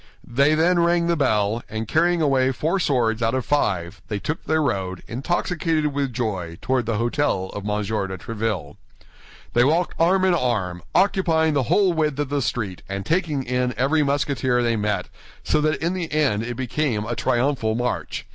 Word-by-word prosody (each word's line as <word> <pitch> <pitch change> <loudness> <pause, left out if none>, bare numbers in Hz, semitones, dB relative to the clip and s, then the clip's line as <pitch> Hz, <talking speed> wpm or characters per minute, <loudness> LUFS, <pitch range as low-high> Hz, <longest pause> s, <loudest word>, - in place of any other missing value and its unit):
They 140 +5 +3
then 170 +3 +3
rang 170 0 +3
the 170 0 +2
bell, 110 -6 +1
and 110 +1 -4
carrying 170 +3 +2
away 135 -2 +3
four 160 +8 -1
swords 120 -8 +1
out 115 +2 +1
of 130 - -2
five, 95 -10 0
they 105 - -2
took 150 +10 -4
their 160 0 +1
road, 95 -7 -2
intoxicated 155 - -1
with 140 -2 -1
joy, 95 -9 -3
toward 130 -3 0
the 115 -2 0
hôtel 115 -5 0
of 100 - -5
M. 105 0 0 0.3
de 95 - -5
Tréville. 105 -7 -4 0.8
They 120 - +5
walked 165 +6 +2
arm 185 +3 +3
in 185 - +4
arm, 105 - -1
occupying 170 -5 +3
the 140 - +2
whole 195 -4 +4
width 155 -4 0
of 145 -2 -2
the 145 0 0
street 105 -7 -3
and 100 0 -4
taking 160 - 0
in 125 -1 -1
every 140 +5 +2
Musketeer 140 -3 +1
they 115 -1 +1
met, 105 -1 -1 0.4
so 150 - +1
that 155 +1 +1
in 170 +2 -1
the 175 -3 -4
end 145 -9 +1
it 120 +1 -4
became 130 -4 -1
a 120 +1 -3
triumphal 120 -3 0
march. 120 +1 -3
130 Hz, 185 wpm, -23 LUFS, 110-155 Hz, 0.8 s, They